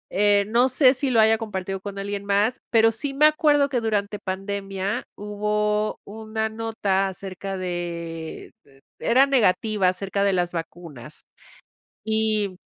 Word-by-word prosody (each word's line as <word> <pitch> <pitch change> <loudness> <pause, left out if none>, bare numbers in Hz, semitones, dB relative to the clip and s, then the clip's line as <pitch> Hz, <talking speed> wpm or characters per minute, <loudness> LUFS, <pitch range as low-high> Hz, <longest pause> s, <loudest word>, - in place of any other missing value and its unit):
Eh, 205 0 +4
no 240 +4 +3
sé, 260 0 +5
si 270 +1 -1
lo 230 -3 +3
haya 220 +1 +5
compartido 195 -3 -4
con 200 -1 -7
alguien 200 0 -4
más, 205 +5 +1
pero 225 -1 +5
sí 275 +4 -4
me 300 +2 +5
acuerdo 295 -2 +4
que 250 -4 -1
durante 210 -2 -1
pandemia, 195 +1 -3
hubo 210 +1 -1
una 220 +1 -4
nota 215 -3 -1
acerca 195 0 -6
de 170 -3 -5
de 135 -1 -23 0.2
era 260 +4 +4
negativa 215 -6 +2
acerca 195 +2 -2
de 200 -1 +2
las 175 -1 0
vacunas, 165 -4 -8 0.8
y 215 -3 0
205 Hz, 140 wpm, -24 LUFS, 190-225 Hz, 0.8 s, sé